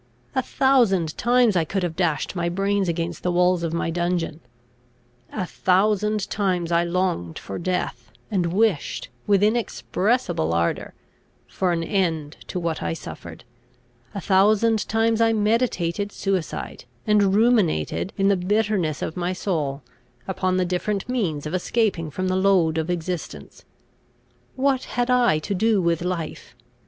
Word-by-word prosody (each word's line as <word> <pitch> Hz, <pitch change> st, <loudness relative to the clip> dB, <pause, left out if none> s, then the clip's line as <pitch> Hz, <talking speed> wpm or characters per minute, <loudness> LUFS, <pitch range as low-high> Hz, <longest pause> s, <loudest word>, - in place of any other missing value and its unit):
A 260 Hz, -, +1 dB
thousand 230 Hz, -, +2 dB
times 240 Hz, -3 st, +3 dB
I 170 Hz, -, +3 dB
could 190 Hz, +4 st, -2 dB
have 170 Hz, -2 st, -2 dB
dashed 170 Hz, -2 st, -1 dB
my 170 Hz, -1 st, 0 dB
brains 195 Hz, +1 st, 0 dB
against 170 Hz, 0 st, -3 dB
the 180 Hz, -, 0 dB
walls 180 Hz, 0 st, +3 dB
of 165 Hz, -1 st, -2 dB
my 165 Hz, 0 st, -1 dB
dungeon; 175 Hz, -2 st, -1 dB, 0.9 s
a 185 Hz, -, -3 dB
thousand 210 Hz, +3 st, +1 dB
times 180 Hz, -4 st, 0 dB
I 170 Hz, 0 st, +3 dB
longed 170 Hz, -, -1 dB
for 95 Hz, -, -6 dB
death, 145 Hz, -10 st, -3 dB, 0.2 s
and 175 Hz, -4 st, 0 dB
wished, 200 Hz, -5 st, 0 dB, 0.2 s
with 200 Hz, -1 st, +4 dB
inexpressible 215 Hz, -, 0 dB
ardour, 85 Hz, 0 st, -1 dB, 0.5 s
for 185 Hz, -2 st, -1 dB
an 165 Hz, -1 st, 0 dB
end 165 Hz, -6 st, -1 dB
to 180 Hz, -, -3 dB
what 170 Hz, -2 st, -2 dB
I 85 Hz, -1 st, -1 dB
suffered; -, -, -9 dB, 0.7 s
a -, -, -2 dB
thousand 210 Hz, +3 st, +3 dB
times 225 Hz, 0 st, +2 dB
I 225 Hz, 0 st, +4 dB
meditated 205 Hz, -4 st, 0 dB
suicide, 190 Hz, -11 st, -3 dB, 0.2 s
and 205 Hz, -2 st, +3 dB
ruminated, 190 Hz, -, +2 dB
in 195 Hz, -, +2 dB
the 200 Hz, -, +4 dB
bitterness 190 Hz, -4 st, 0 dB
of 160 Hz, -, -4 dB
my 180 Hz, 0 st, -1 dB
soul, 150 Hz, -7 st, -2 dB, 0.4 s
upon 185 Hz, -1 st, 0 dB
the 185 Hz, -, +2 dB
different 185 Hz, +3 st, -2 dB
means 185 Hz, -, -1 dB
of 150 Hz, -, -4 dB
escaping 185 Hz, -3 st, 0 dB
from 185 Hz, +6 st, -3 dB
the 185 Hz, -, 0 dB
load 185 Hz, -4 st, +3 dB
of 160 Hz, +2 st, -3 dB
existence. 170 Hz, -, -5 dB, 0.9 s
What 265 Hz, -1 st, +1 dB
had 245 Hz, +1 st, +1 dB
I 245 Hz, -10 st, +4 dB
to 155 Hz, +6 st, -3 dB
do 215 Hz, +2 st, +2 dB
with 170 Hz, -2 st, +1 dB
life? 175 Hz, -3 st, -4 dB
185 Hz, 145 wpm, -23 LUFS, 165-210 Hz, 0.9 s, with